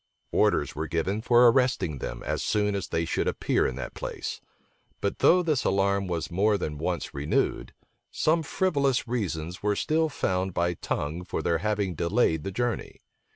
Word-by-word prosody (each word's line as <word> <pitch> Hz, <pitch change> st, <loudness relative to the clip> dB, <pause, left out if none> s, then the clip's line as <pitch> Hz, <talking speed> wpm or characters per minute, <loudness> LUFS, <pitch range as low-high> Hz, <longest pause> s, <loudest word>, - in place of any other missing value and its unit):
Orders -, -, +2 dB
were 80 Hz, +2 st, -3 dB
given 95 Hz, +7 st, -1 dB
for 120 Hz, +1 st, +6 dB
arresting 115 Hz, -, +1 dB
them, -, -, -5 dB
as -, -, -2 dB
soon 105 Hz, -1 st, +1 dB
as 100 Hz, -2 st, -3 dB
they 80 Hz, 0 st, -1 dB
should -, -, -1 dB
appear -, -, +1 dB
in 65 Hz, -, -4 dB
that 65 Hz, -, -6 dB
place: -, -, -5 dB, 0.6 s
but 100 Hz, -, -2 dB
though 180 Hz, +1 st, +5 dB
this 155 Hz, -6 st, +1 dB
alarm 100 Hz, 0 st, +1 dB
was 85 Hz, -2 st, -3 dB
more 100 Hz, +4 st, +2 dB
than 75 Hz, -5 st, -4 dB
once 85 Hz, +1 st, -2 dB
renewed, 70 Hz, +1 st, -1 dB, 0.4 s
some 165 Hz, +2 st, +2 dB
frivolous 140 Hz, -7 st, +1 dB
reasons 90 Hz, -7 st, -3 dB
were 105 Hz, 0 st, +1 dB
still 160 Hz, +7 st, +1 dB
found 95 Hz, -, -1 dB
by 85 Hz, 0 st, +1 dB
Tongue 80 Hz, +1 st, -3 dB
for 90 Hz, -, -4 dB
their 85 Hz, -1 st, +1 dB
having 105 Hz, -2 st, -1 dB
delayed 85 Hz, -2 st, +1 dB
the 95 Hz, -, -4 dB
journey. 120 Hz, +3 st, -3 dB
100 Hz, 170 wpm, -27 LUFS, 85-120 Hz, 0.6 s, for